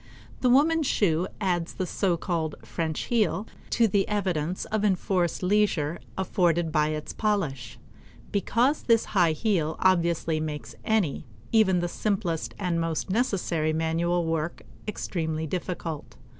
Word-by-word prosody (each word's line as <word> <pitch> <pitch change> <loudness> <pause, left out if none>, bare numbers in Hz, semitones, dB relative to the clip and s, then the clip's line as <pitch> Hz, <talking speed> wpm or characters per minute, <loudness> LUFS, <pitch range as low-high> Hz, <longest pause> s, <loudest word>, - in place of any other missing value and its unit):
The 250 - +2
woman's 300 +4 +4
shoe 180 -3 +2
adds 180 -4 -1
the 185 - -1
so 180 0 0
called 165 -3 -2
French 160 -2 -3
heel 215 -4 +1 0.2
to 230 - +3
the 195 -1 +1
evidence 185 -5 -1
of 215 -1 -1
enforced 185 -3 +1
leisure 180 -5 +2 0.2
afforded 175 -3 +1
by 150 -1 +3
its 155 0 -4
polish; 195 - -1 0.5
because 240 +8 +2
this 230 -2 +3
high 175 -5 +4
heel 160 -4 0
obviously 170 -3 +2
makes 150 -1 -5
any, 205 - 0 0.2
even 190 -5 +4
the 175 - 0
simplest 175 -4 -2
and 175 -4 0
most 165 +2 -2
necessary 180 -8 0
manual 165 +2 +1
work 165 0 -2 0.2
extremely 160 -6 -2
difficult. 165 -2 -4
175 Hz, 130 wpm, -27 LUFS, 160-205 Hz, 0.5 s, woman's